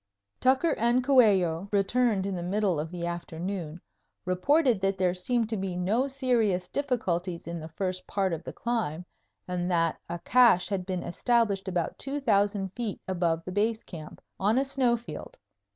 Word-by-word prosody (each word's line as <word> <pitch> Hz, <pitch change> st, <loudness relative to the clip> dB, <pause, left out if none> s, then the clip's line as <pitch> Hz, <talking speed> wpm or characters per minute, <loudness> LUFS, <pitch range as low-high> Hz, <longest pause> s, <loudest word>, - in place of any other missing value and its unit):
Tucker 265 Hz, +5 st, +3 dB
and 240 Hz, +3 st, +3 dB
Coello 200 Hz, -9 st, +4 dB
returned 205 Hz, 0 st, +2 dB
in 195 Hz, -1 st, -2 dB
the 175 Hz, -, -4 dB
middle 190 Hz, -1 st, 0 dB
of 155 Hz, +2 st, -3 dB
the 175 Hz, 0 st, -5 dB
afternoon, 170 Hz, 0 st, -4 dB, 0.5 s
reported 240 Hz, -, +2 dB
that 195 Hz, 0 st, +1 dB
there 180 Hz, -1 st, +2 dB
seemed 225 Hz, +5 st, 0 dB
to 220 Hz, -, -1 dB
be 190 Hz, -2 st, -3 dB
no 210 Hz, +9 st, +1 dB
serious 235 Hz, -9 st, +1 dB
difficulties 185 Hz, -12 st, -2 dB
in 170 Hz, 0 st, -4 dB
the 160 Hz, -, -7 dB
first 185 Hz, +2 st, -3 dB
part 190 Hz, -3 st, 0 dB
of 165 Hz, -, -4 dB
the -, -, -6 dB
climb 215 Hz, -9 st, -2 dB, 0.4 s
and 180 Hz, 0 st, -2 dB
that 165 Hz, -2 st, +1 dB
a 170 Hz, -, -3 dB
cache 225 Hz, -2 st, +4 dB
had 190 Hz, -3 st, -2 dB
been 185 Hz, -2 st, -2 dB
established 210 Hz, -1 st, +1 dB
about 175 Hz, -3 st, -2 dB
2000 205 Hz, -8 st, +1 dB
feet 235 Hz, -5 st, -4 dB
above 170 Hz, -3 st, 0 dB
the 185 Hz, -, -5 dB
Base 220 Hz, +3 st, 0 dB
Camp, 155 Hz, -4 st, -10 dB, 0.2 s
on 210 Hz, +5 st, +2 dB
a 270 Hz, -, +2 dB
snow 260 Hz, -3 st, +2 dB
field. 240 Hz, -, -9 dB
195 Hz, 170 wpm, -28 LUFS, 180-235 Hz, 0.5 s, Coello